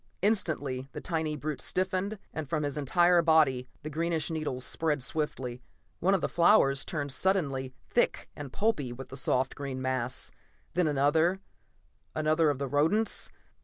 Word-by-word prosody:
Instantly 145 Hz, -11 st, 0 dB
the -, -, -5 dB
tiny 160 Hz, -3 st, -2 dB
brute 150 Hz, +1 st, -4 dB
stiffened, 190 Hz, +3 st, 0 dB, 0.2 s
and 155 Hz, -4 st, -5 dB
from 155 Hz, -2 st, 0 dB
his 145 Hz, -1 st, -2 dB
entire 175 Hz, +5 st, +4 dB
body 150 Hz, -6 st, +3 dB, 0.2 s
the 155 Hz, -, -4 dB
greenish 165 Hz, +1 st, -1 dB
needles 150 Hz, -5 st, -2 dB
spread 150 Hz, -4 st, 0 dB
swiftly. 130 Hz, -4 st, -3 dB, 0.4 s
One 195 Hz, +3 st, +3 dB
of 190 Hz, -, -1 dB
the -, -, +1 dB
flowers 170 Hz, -7 st, +4 dB
turned 145 Hz, -3 st, -3 dB
suddenly 135 Hz, -8 st, 0 dB
thick -, -, +1 dB
and 145 Hz, -3 st, -7 dB
pulpy 200 Hz, -, 0 dB
with 130 Hz, +2 st, -8 dB
the 135 Hz, -, -8 dB
soft 130 Hz, 0 st, +1 dB
green 135 Hz, -2 st, -5 dB
mass, 130 Hz, -1 st, -2 dB, 0.4 s
then 180 Hz, -2 st, +2 dB
another, 155 Hz, +6 st, +2 dB, 0.8 s
another 155 Hz, +1 st, +3 dB
of 145 Hz, -, 0 dB
the 140 Hz, 0 st, -2 dB
rodents 160 Hz, -, +1 dB
150 Hz, 155 wpm, -29 LUFS, 135-170 Hz, 0.8 s, entire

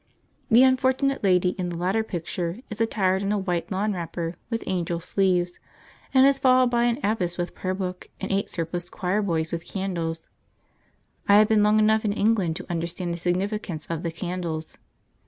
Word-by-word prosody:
The 240 Hz, +2 st, +7 dB
unfortunate 260 Hz, +1 st, +2 dB
lady 180 Hz, -2 st, +4 dB
in 180 Hz, -1 st, -1 dB
the 170 Hz, -, -5 dB
latter 190 Hz, +6 st, +1 dB
picture 175 Hz, +1 st, -4 dB
is 215 Hz, -, -4 dB
attired 190 Hz, -4 st, +1 dB
in 200 Hz, 0 st, -1 dB
a 210 Hz, -, +1 dB
white 180 Hz, -3 st, -2 dB
lawn 205 Hz, +3 st, 0 dB
wrapper 170 Hz, -1 st, -4 dB
with 230 Hz, -2 st, -2 dB
angel 175 Hz, -2 st, -1 dB
sleeves, 180 Hz, 0 st, 0 dB, 0.5 s
and 260 Hz, 0 st, +6 dB
is 275 Hz, 0 st, +4 dB
followed 255 Hz, -1 st, +4 dB
by 240 Hz, 0 st, +2 dB
an 240 Hz, 0 st, +1 dB
abbess 190 Hz, -5 st, 0 dB
with 175 Hz, 0 st, -3 dB
prayer 185 Hz, 0 st, -3 dB
book, 185 Hz, -1 st, -5 dB
and 195 Hz, -, -4 dB
eight 195 Hz, +1 st, 0 dB
surpliced 175 Hz, +1 st, -3 dB
choir 185 Hz, +4 st, -1 dB
boys 165 Hz, -5 st, -1 dB
with 165 Hz, -1 st, -3 dB
candles. 170 Hz, -4 st, -3 dB, 1.0 s
I 200 Hz, -, +7 dB
have 215 Hz, 0 st, +5 dB
been 215 Hz, -1 st, +4 dB
long 210 Hz, +1 st, +4 dB
enough 215 Hz, 0 st, +3 dB
in 205 Hz, -2 st, 0 dB
England 205 Hz, -6 st, +1 dB
to -, -, -6 dB
understand 170 Hz, +1 st, -3 dB
the 170 Hz, -, -5 dB
significance 180 Hz, -1 st, -2 dB
of 165 Hz, -1 st, -2 dB
the 170 Hz, -, -3 dB
candles. 170 Hz, -2 st, -4 dB
185 Hz, 185 wpm, -25 LUFS, 175-215 Hz, 1.0 s, The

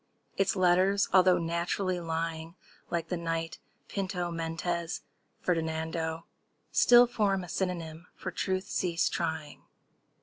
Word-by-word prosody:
Its 195 Hz, 0 st, +1 dB
letters, 185 Hz, +2 st, +3 dB
although 185 Hz, -1 st, +6 dB
naturally 175 Hz, +2 st, -1 dB
lying 165 Hz, 0 st, -3 dB, 0.3 s
Like 170 Hz, -1 st, -2 dB
the 180 Hz, -, -1 dB
knight 165 Hz, -1 st, -3 dB, 0.3 s
Pinto—Mendez 170 Hz, -3 st, -2 dB, 0.4 s
Ferdinando— 160 Hz, -1 st, -1 dB, 0.5 s
Still 245 Hz, 0 st, +7 dB
form 205 Hz, -5 st, 0 dB
a -, -, -8 dB
synonym 170 Hz, -1 st, -3 dB
for 185 Hz, -, -5 dB
Truth—Cease 185 Hz, -2 st, 0 dB
trying! 160 Hz, -3 st, -3 dB
170 Hz, 100 wpm, -30 LUFS, 165-185 Hz, 0.5 s, Still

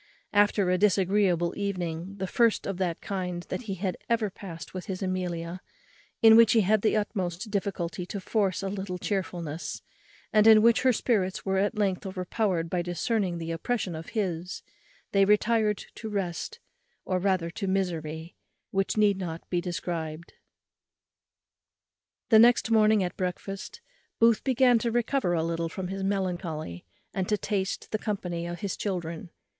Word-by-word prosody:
After 205 Hz, -2 st, +3 dB
a 180 Hz, -, +2 dB
disagreeable 190 Hz, -3 st, +2 dB
evening, 180 Hz, -2 st, -3 dB
the 190 Hz, -, -2 dB
first 230 Hz, +4 st, +2 dB
of 195 Hz, -2 st, -3 dB
that 180 Hz, -3 st, -2 dB
kind 180 Hz, -3 st, -3 dB
that -, -, -3 dB
he 195 Hz, -3 st, -3 dB
had 185 Hz, -1 st, -2 dB
ever 225 Hz, -3 st, +1 dB
passed 165 Hz, -6 st, -9 dB
with 185 Hz, -1 st, -6 dB
his 190 Hz, 0 st, -4 dB
Amelia, 180 Hz, -1 st, -3 dB, 0.6 s
in 220 Hz, 0 st, +9 dB
which 230 Hz, -1 st, +7 dB
he 225 Hz, -, +5 dB
had 210 Hz, +2 st, +3 dB
the 215 Hz, 0 st, +2 dB
utmost 200 Hz, -1 st, -3 dB
difficulty 185 Hz, -4 st, -2 dB
to 200 Hz, -, -4 dB
force 195 Hz, -1 st, 0 dB
a -, -, -1 dB
little 190 Hz, -2 st, -4 dB
chearfulness, 175 Hz, -5 st, -3 dB, 0.5 s
and 215 Hz, 0 st, +6 dB
in 215 Hz, -1 st, +8 dB
which 230 Hz, 0 st, +5 dB
her 260 Hz, -, +5 dB
spirits 205 Hz, -6 st, 0 dB
were 190 Hz, 0 st, +1 dB
at 205 Hz, +3 st, 0 dB
length 195 Hz, -2 st, 0 dB
overpowered 185 Hz, -2 st, -1 dB
by 175 Hz, +1 st, -1 dB
discerning 175 Hz, +2 st, -1 dB
the 165 Hz, 0 st, -4 dB
oppression 180 Hz, +1 st, -2 dB
on 160 Hz, -, -5 dB
his, 180 Hz, -5 st, -3 dB, 0.5 s
they 195 Hz, -1 st, +4 dB
retired 210 Hz, +1 st, +2 dB
to 220 Hz, -, -7 dB
rest, 200 Hz, -, -3 dB, 0.5 s
or 185 Hz, -1 st, 0 dB
rather 185 Hz, -3 st, 0 dB
to 195 Hz, +2 st, -4 dB
misery, 165 Hz, -4 st, -2 dB, 0.4 s
which 195 Hz, +2 st, 0 dB
need 205 Hz, -2 st, +4 dB
not 170 Hz, -3 st, -5 dB
be 175 Hz, -1 st, +1 dB
described. 170 Hz, -2 st, -4 dB, 2.0 s
The 220 Hz, -, +7 dB
next 235 Hz, 0 st, +5 dB
morning 215 Hz, -2 st, +5 dB
at 180 Hz, -, -3 dB
breakfast, 190 Hz, -, -4 dB, 0.4 s
Booth 230 Hz, -1 st, +4 dB
began 255 Hz, -2 st, +4 dB
to 235 Hz, -, -1 dB
recover 240 Hz, -4 st, +1 dB
a 160 Hz, -, +1 dB
little 165 Hz, 0 st, -1 dB
from 180 Hz, +2 st, -5 dB
his 195 Hz, 0 st, -4 dB
melancholy, 175 Hz, -, -3 dB, 0.3 s
and 185 Hz, -1 st, -2 dB
to 210 Hz, -, +2 dB
taste 195 Hz, -2 st, -2 dB
the 215 Hz, -, -1 dB
company 180 Hz, -6 st, -3 dB
of 175 Hz, -1 st, -6 dB
his 200 Hz, -, -2 dB
children. 175 Hz, -3 st, -4 dB
190 Hz, 160 wpm, -28 LUFS, 175-210 Hz, 2.0 s, in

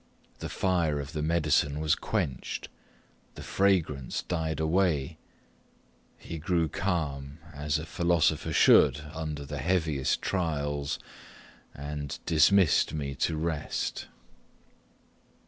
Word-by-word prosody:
The -, -, -5 dB
fire 85 Hz, -6 st, +1 dB
of 70 Hz, +2 st, -6 dB
the 75 Hz, -, -2 dB
medicine 75 Hz, -2 st, +1 dB
was 80 Hz, -1 st, +2 dB
quenched 65 Hz, -2 st, -3 dB, 0.7 s
the -, -, -8 dB
fragrance 85 Hz, -9 st, +1 dB
died 80 Hz, -3 st, -2 dB
away 80 Hz, -3 st, +1 dB, 1.0 s
he 85 Hz, -, -7 dB
grew 85 Hz, 0 st, +1 dB
calm, 75 Hz, -6 st, -2 dB, 0.2 s
as 75 Hz, +1 st, -1 dB
a 80 Hz, -, -5 dB
philosopher 85 Hz, -2 st, +1 dB
should 70 Hz, +3 st, +5 dB
under 75 Hz, -3 st, -4 dB
the 75 Hz, 0 st, -5 dB
heaviest 80 Hz, -4 st, +1 dB
trials, 75 Hz, -6 st, -1 dB, 0.8 s
and 75 Hz, 0 st, -5 dB
dismissed 85 Hz, +3 st, +4 dB
me 70 Hz, -2 st, -3 dB
to 80 Hz, +3 st, -1 dB
rest. 80 Hz, -1 st, -2 dB
75 Hz, 105 wpm, -28 LUFS, 70-85 Hz, 1.0 s, should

